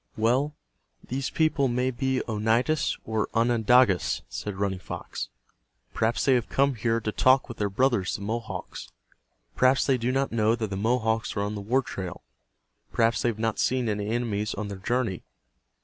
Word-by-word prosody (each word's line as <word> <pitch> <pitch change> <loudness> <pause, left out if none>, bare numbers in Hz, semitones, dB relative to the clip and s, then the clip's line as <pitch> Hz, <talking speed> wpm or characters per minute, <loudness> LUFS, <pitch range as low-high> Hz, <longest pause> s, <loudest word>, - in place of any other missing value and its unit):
"Well, 130 +7 +1 0.5
these 130 +1 -2
people 155 -4 +2
may 125 +1 0
he 130 +1 -1
Oneidas 115 +7 +1
or 110 -1 -1
Onondagas," 115 -3 +3
said 105 -2 -5
Running 95 -1 -1
Fox. - - -6 0.6
"Perhaps 110 +1 0
they 135 - +5
have 120 -3 +1
come 140 0 +2
here 115 0 0
to 105 -1 -3
talk 130 +4 +4
with 120 - -9
their 105 -1 +1
brothers, 115 -3 +1
the - - -6
Mohawks. 115 +2 -5 0.7
Perhaps 130 +1 +4
they 130 -2 +2
do 120 +2 0
not 135 +1 0
know 110 0 +2
that 110 -3 -4
the - - -2
Mohawks 110 +1 0
are - - +1
on 105 +1 -2
the 105 - -5
war 125 +7 +1
trail. 95 -7 -6 0.7
Perhaps 115 -1 +2
they 120 - +2
have 110 - -3
not 115 0 -1
seen 125 -1 +1
any 105 -1 -2
enemies 110 -3 -1
on 105 0 -4
their 100 -1 -6
journey. 115 -3 -1
115 Hz, 175 wpm, -26 LUFS, 105-130 Hz, 0.7 s, they